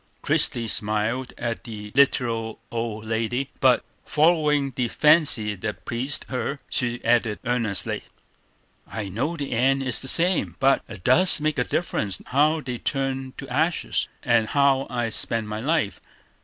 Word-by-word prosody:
Christie 115 -2 +3
smiled 110 +5 -1
at 115 -1 -4
the 105 -4 -8
literal 115 -5 +1
old 115 -2 -4
lady; 115 +4 -2
but, 130 -2 +3 0.2
following 150 -3 +2
the 125 - 0
fancy 150 -7 +3
that 105 +2 -6
pleased 130 +4 0
her, 135 +2 -3
she 120 -1 -2
added 115 -2 +2
earnestly: 115 -5 0 0.8
"I 105 -3 -5
know 135 - -2
the 140 -2 -5
end 135 +3 +2
is 125 -3 +1
the 135 - -7
same; 175 +5 +3
but 135 0 +3
it 105 -6 -10
does 180 +8 +3
make 150 -2 -1
a - - +3
difference 105 - -2
how 155 +4 +2
they 125 -3 -5
turn 135 0 -2
to 135 - -8
ashes, 155 +7 0 0.2
and 120 -4 +2
how 140 0 +2
I 120 -2 -2
spend 110 +1 -1
my 105 0 -4
life. 150 -5 -1
125 Hz, 150 wpm, -24 LUFS, 115-140 Hz, 0.8 s, Christie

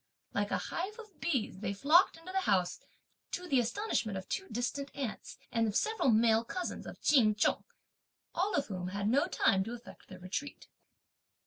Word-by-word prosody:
Like - - 0
a - - +1
hive 385 +5 -4
of 425 -7 -13
bees 245 - -1
they 200 -1 -2
flocked 315 - +5
into 330 +3 -9
the 385 - +1
house, 185 - +1 0.5
to 360 - -3
the 275 -6 +3
astonishment 240 - -1
of 190 - -7
two 385 - -3
distant 250 +4 -2
aunts, 265 -6 -5
and 230 -1 +2
of 205 - -2
several 440 -10 +2
male 225 0 +4
cousins 360 +9 -4
of - - -9
Ch'in 225 -8 +5
Chung, 210 - +1 0.7
all 385 +4 0
of - - +1
whom 185 -3 -4
had 200 +2 -2
no 280 +9 +3
time 195 - +3
to 230 - -5
effect 240 0 -11
their 185 - -10
retreat. 185 +11 -5
240 Hz, 185 wpm, -32 LUFS, 210-345 Hz, 0.7 s, flocked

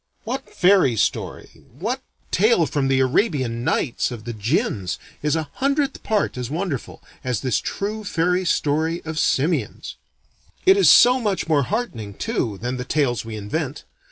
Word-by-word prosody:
What 260 +4 -4
fairy 180 - +4
story, - - -2
what - - -2 0.3
tale 205 -3 +4
from 145 -3 -1
the 135 0 +3
Arabian 130 - +1
Nights 125 - 0
of 120 -4 -7
the 120 +1 -5
jinns, 105 - -1 0.2
is 150 +1 +1
a 155 -3 -3
hundredth 280 +1 0
part 210 -11 0
as 125 -1 -4
wonderful 155 - -4 0.2
as 125 -4 -1
this 130 -5 +1
true 215 +2 -4
fairy 180 -1 +1
story 160 0 0
of 160 -1 -3
simians! 150 +5 0 0.7
It 380 +1 +7
is 395 - +5
so 250 +1 +7
much 205 -7 -1
more 155 -3 +3
heartening, 115 - -3
too, 120 - -2
than 125 +5 -3
the 125 - -3
tales 125 -4 0
we 115 -1 -7
invent. 105 -1 -4
150 Hz, 155 wpm, -22 LUFS, 120-200 Hz, 0.7 s, It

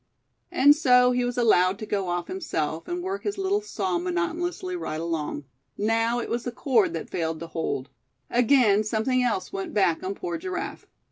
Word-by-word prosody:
And 285 +2 +6
so 250 -4 +5
he 250 0 +1
was 245 0 -2
allowed 195 -5 +4
to 215 - -6
go 200 -3 -2
off 175 0 -1
himself, 165 - -3
and 350 0 -3
work 385 +2 -3
his 410 -1 -3
little 390 +2 +1
saw 375 -3 -2
monotonously 355 +1 -2
right 155 - -4
along. 160 -3 -3 0.3
Now 225 +3 +1
it 235 - -4
was 235 0 -2
the 245 - -3
cord 235 - +2
that 165 - -5
failed 160 -2 -2
to - - -4
hold; 160 -5 -3 0.4
again 235 -4 +4
something 225 +4 +1
else 235 -6 -1
went 195 +2 -5
back 180 -5 +2
on 190 +2 -3
poor 345 - -4
Giraffe. 370 +1 -5
240 Hz, 185 wpm, -26 LUFS, -, 0.4 s, And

